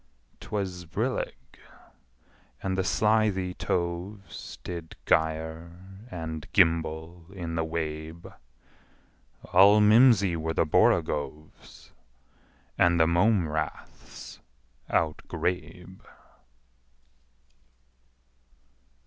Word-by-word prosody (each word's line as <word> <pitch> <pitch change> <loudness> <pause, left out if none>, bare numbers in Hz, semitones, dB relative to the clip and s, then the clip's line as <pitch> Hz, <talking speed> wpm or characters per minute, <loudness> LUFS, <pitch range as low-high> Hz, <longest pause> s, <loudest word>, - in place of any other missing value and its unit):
'Twas 95 -4 -4
brillig, 65 -5 -4 1.0
and 95 -1 -1
the 95 - 0
slithy 105 -3 +1
toves 90 +4 -4
Did 85 -2 -7
gyre 85 +6 -2
and 80 -4 -6
gimble 80 -1 +1
in 85 -4 -5
the 80 0 0
wabe: 80 0 -5 1.2
All 100 +3 +7
mimsy 105 -4 +5
were 80 0 -3
the - - +2
borogoves, 75 -1 -1 0.9
And 85 -1 +4
the 80 - +6
mome 85 +2 +3
raths 80 0 -6 0.5
outgrabe. 90 +2 -3
85 Hz, 70 wpm, -27 LUFS, 80-95 Hz, 1.2 s, All